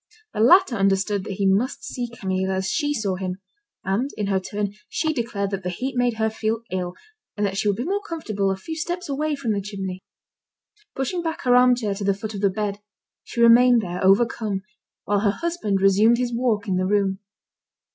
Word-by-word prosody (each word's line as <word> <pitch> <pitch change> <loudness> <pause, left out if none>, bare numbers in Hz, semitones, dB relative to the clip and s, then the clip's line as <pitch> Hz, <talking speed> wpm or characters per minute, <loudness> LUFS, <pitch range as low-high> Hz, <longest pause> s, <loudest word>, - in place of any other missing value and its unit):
The - - -4
latter 275 - +5
understood 195 0 +1
that - - -4
he 195 +1 -1
must 200 +7 +1
see 245 -1 -4
Camille 190 -4 -2
as 190 0 -1
she 290 -2 0
saw 205 -9 -1
him; 185 -1 -4 0.5
and, 205 +9 0
in 210 - -1
her 195 -1 +2
turn, 205 +1 -3 0.2
she 315 -1 0
declared 220 -6 -2
that 195 -1 -3
the 180 - -3
heat 255 +9 -4
made 245 -1 +1
her 220 0 +1
feel 220 +1 -2
ill, 180 -1 -3 0.4
and 205 - +1
that 195 -1 -2
she 200 - 0
would 200 - +1
be 240 - -2
more 395 +7 -1
comfortable 220 - -2
a 190 - 0
few 320 +12 -6
steps 350 +3 -3
away 300 +2 -1
from 270 -5 -2
the 200 - -1
chimney. 190 -2 -5 0.9
Pushing 270 +7 -2
back 325 -1 -4
her 245 -1 +4
armchair 245 -4 +4
to 200 +1 -5
the 200 0 +2
foot 220 +2 -6
of 200 - -5
the 200 - +4
bed, 205 +1 -3 0.4
she 235 - -4
remained 235 0 +6
there 180 -1 -4
overcome, 200 0 +2 0.4
while 205 0 +1
her 205 0 +2
husband 275 - -1
resumed 205 +4 +5
his 245 -1 -1
walk 230 -4 0
in 185 -2 0
the 185 0 0
room. 195 -1 +1
210 Hz, 205 wpm, -23 LUFS, 195-245 Hz, 0.9 s, remained